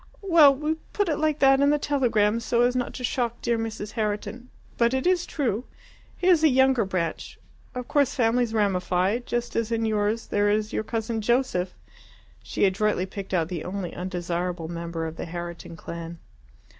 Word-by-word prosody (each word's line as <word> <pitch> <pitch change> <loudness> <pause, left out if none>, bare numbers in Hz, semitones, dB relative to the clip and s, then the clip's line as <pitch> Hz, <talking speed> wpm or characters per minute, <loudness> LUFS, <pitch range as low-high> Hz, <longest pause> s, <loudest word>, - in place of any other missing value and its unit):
"Well, 325 -7 +6
we 305 +3 -2 0.2
put 410 -3 +1
it 300 - 0
like 310 -1 +1
that 270 0 +6
in 285 - +5
the 295 - +3
telegram 230 -7 +1
so 235 +1 +1
as 245 +1 +2
not 250 -1 -1
to 255 - -6
shock 240 -1 -1
dear 235 0 +2
Mrs. 220 -2 -4
Herriton. 220 +3 -3 0.3
But 235 +2 +2
it 260 - -1
is 360 -1 +2
true. 245 -5 -1 0.5
He 360 - -4
is 350 -4 +5
a 315 - +7
younger 265 -3 +4
branch. 185 -3 -3 0.4
Of 250 -1 -5
course 285 -3 +2
families 240 -1 +2
ramify 195 -1 +1
just 240 -1 -3
as 230 0 -1
in 225 -1 0
yours 215 +1 0
there 205 0 +1
is 210 +1 0
your - - -1
cousin 225 0 -3
Joseph." 215 -6 0 0.7
She - - 0
adroitly 195 0 +1
picked 195 0 -8
out 170 -4 +1
the 170 -4 -4
only 185 -1 -4
undesirable 175 -1 -3
member 170 -1 -4
of 160 0 -6
the - - -4
Herriton 170 0 -7
clan. 170 +1 -7
225 Hz, 180 wpm, -25 LUFS, 185-255 Hz, 0.7 s, a